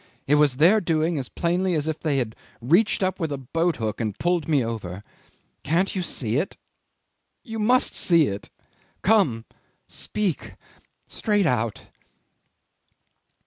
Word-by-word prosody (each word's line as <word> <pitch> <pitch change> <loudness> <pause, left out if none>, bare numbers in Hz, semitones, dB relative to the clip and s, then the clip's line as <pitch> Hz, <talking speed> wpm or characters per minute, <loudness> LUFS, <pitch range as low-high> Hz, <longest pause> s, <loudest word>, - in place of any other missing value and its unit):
It 145 - +1
was 150 -3 +4
their 180 +10 +5
doing 160 -2 0
as 130 - -5
plainly 175 +1 0
as 150 0 -1
if 160 -1 -2
they 150 -4 0
had 115 -4 -2 0.2
reached 175 - +2
up 185 0 -1
with 160 -4 -2
a 140 - -2
boat 165 +6 -1
hook 110 -1 -3
and 110 -3 -3
pulled 175 -2 0
me 145 -6 +2
over. 100 -4 -5 0.6
Can't 175 +8 0
you 190 - -1
see 120 -8 -1
it? 165 +7 -2 0.9
You 225 -4 -6
must 245 +4 +3
see 170 -3 +4
it. 100 -3 -5 0.5
Come. 175 - +2 0.4
Speak 140 - -3 0.5
straight 205 -3 0
out." 115 -7 -1
155 Hz, 145 wpm, -24 LUFS, 120-185 Hz, 0.9 s, their